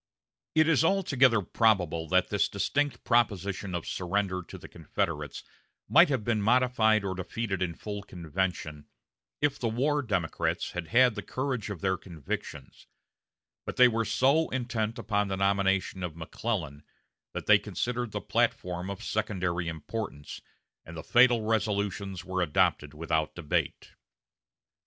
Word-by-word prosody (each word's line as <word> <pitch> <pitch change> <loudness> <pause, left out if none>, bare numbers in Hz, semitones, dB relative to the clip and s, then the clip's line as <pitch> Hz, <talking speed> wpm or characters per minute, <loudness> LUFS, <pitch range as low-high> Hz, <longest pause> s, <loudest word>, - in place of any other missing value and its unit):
It 155 0 +5
is 165 -2 +4
altogether 140 - +3
probable 90 -7 +1
that 95 +2 +2
this 105 - +1
distinct 145 +8 -1
proposition 100 -5 0
of 85 - -4
surrender 95 0 -1
to 85 - -11
the - - -11
Confederates - - -4 0.4
might - - +6
have 130 -6 0
been 110 -1 0
modified 110 -2 +3
or 95 - -1
defeated 95 +1 -3
in 85 -3 -1
full 105 -1 -6
convention 85 -4 -4 0.6
if 145 -2 +1
the 120 - -1
war 145 +6 +1
Democrats 95 - -1
had 90 -2 -5
had 125 +3 +5
the 105 - -5
courage 130 -4 -3
of 100 -5 -6
their 95 -1 +1
convictions; 75 -5 -7 0.8
but - - -6
they 125 - +7
were 115 -1 0
so 140 +8 +2
intent 120 -3 -2
upon 105 -3 0
the 95 -1 -2
nomination 95 -1 +1
of 90 -3 -4
McClellan, 80 -3 -4 0.5
that - - -4
they - - +6
considered 120 -1 -3
the - - -4
platform 90 +1 -1
of 100 -1 -6
secondary 90 -5 -1
importance, 80 -1 -6 0.4
and 80 +1 -10
the 80 - -6
fatal 120 -2 +5
resolutions 100 -4 -1
were 95 0 -2
adopted 75 -2 +1
without 80 -1 -1
debate. 80 -4 -2
100 Hz, 140 wpm, -28 LUFS, 90-115 Hz, 0.8 s, they